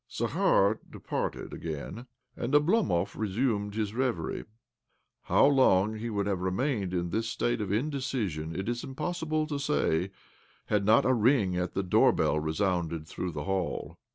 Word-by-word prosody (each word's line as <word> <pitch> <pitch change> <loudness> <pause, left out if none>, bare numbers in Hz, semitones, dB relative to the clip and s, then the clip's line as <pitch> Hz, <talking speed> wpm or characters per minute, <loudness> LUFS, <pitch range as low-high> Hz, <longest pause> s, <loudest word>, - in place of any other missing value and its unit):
Zakhar 100 +3 +2
departed - - -4
again, 85 - -6 0.3
and 125 +5 -1
Oblomov 145 - +2
re 110 - -2
sumed 105 -1 -1
his 105 -2 -2
reverie. 125 0 -2 0.8
How - - +4
long 110 -8 +4
he 115 +2 -3
would 100 -2 -1
have 100 -3 -1
remained 95 +1 -1
in 85 -1 -2
this 115 +3 -1
state 120 0 -1
of 100 - -3
indecision 110 - -2
it 95 - -3
is 120 0 -2
impossible 155 +2 -2
to 145 -2 -3
say 95 - +1 0.6
had 105 -2 +1
not 110 +6 +5
a 130 - +4
ring 115 -5 +3
at 90 0 -2
the 95 - 0
doorbell 90 -3 +3
resounded 85 0 -1
thtough 90 +2 -4
the 75 -2 -5
hall. 95 -2 -3
105 Hz, 155 wpm, -29 LUFS, 90-130 Hz, 0.8 s, not